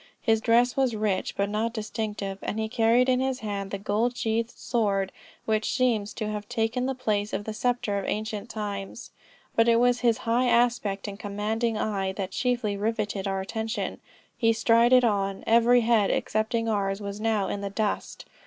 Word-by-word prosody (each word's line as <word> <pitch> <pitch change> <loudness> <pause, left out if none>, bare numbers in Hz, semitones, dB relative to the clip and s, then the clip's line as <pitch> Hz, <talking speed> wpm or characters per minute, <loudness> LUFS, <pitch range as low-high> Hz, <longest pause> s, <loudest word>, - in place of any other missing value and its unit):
His 225 -1 +2
dress 240 +2 +3
was 260 -4 +1
rich 210 -3 -1
but 200 - +1
not 220 +3 -2
distinctive, 210 -2 -4
and 210 - -3
he 220 - -1
carried 230 +2 +3
in 255 -1 +3
his 265 0 -1
hand 200 -2 -4
the 200 - -3
gold 215 +5 0
sheathed 225 +1 0
sword, 200 -6 -1 0.3
which 215 0 0
seems 230 -5 +1
to 215 - -3
have 210 -1 -5
taken 240 +1 0
the 265 - -2
place 215 -5 -1
of 200 - -2
the 220 - -5
sceptre 230 -3 0
of 195 - -5
ancient 215 -1 -3
times. 205 +1 -5 0.4
But 230 0 +4
it 230 - +5
was 245 +1 +3
his 235 -2 +2
high 240 +2 +2
aspect 235 -4 +1
and 200 0 -7
commanding 215 +3 -1
eye, 195 -3 -1
that 190 -1 -4
chiefly 240 -2 0
rivetted 210 -1 -2
our 195 0 -1
attention. 220 +3 -3 0.4
He 225 -2 +3
strided 235 +3 +5
on. 195 -3 0
Every 235 +2 +5
head 225 -3 +3
excepting 230 +1 0
ours, 195 -2 0
was 200 0 -6
now 220 -3 +1
in 200 - -3
the 200 - -3
dust. 210 +1 -3
220 Hz, 180 wpm, -26 LUFS, 205-235 Hz, 0.4 s, it